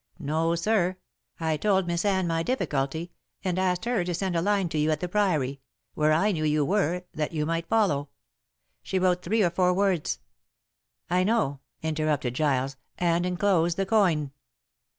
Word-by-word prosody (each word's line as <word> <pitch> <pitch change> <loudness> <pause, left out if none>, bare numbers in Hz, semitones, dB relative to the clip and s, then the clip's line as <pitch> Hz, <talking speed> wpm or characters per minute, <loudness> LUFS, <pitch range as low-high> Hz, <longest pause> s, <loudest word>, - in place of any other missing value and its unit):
No, 165 +1 0
sir. 185 0 +1 0.4
I 160 -2 0
told 190 +1 +2
Miss 170 +2 -1
Anne 190 -2 +2
my 165 -1 0
difficulty, 160 - -2 0.3
and 185 -1 -1
asked 185 +2 0
her 235 -6 +1
to 175 0 -2
send 185 0 -2
a 165 - +2
line 200 0 +1
to 155 - -2
you 150 +1 +2
at 155 -1 +1
the 180 - -2
Priory 155 -9 0 0.3
where 155 0 +2
I 190 +7 +3
knew 160 -5 -2
you 150 -1 +2
were 180 -1 0
that 155 +1 -3
you 150 -1 -1
might 165 +1 -2
follow. 155 -11 +2 0.7
She 190 - -2
wrote 180 -1 +2
three 215 +5 +1
or 175 - +2
four 180 +1 +2
words 185 - +1 0.5
" - - -52
"I 180 +1 +3
know," 195 -10 +1 0.2
interrupted 155 -5 0
Giles, 135 -1 0 0.2
"and 175 0 +1
enclosed 180 -2 +1
the 195 - +1
coin." 180 -9 +2
170 Hz, 175 wpm, -27 LUFS, 155-190 Hz, 0.7 s, I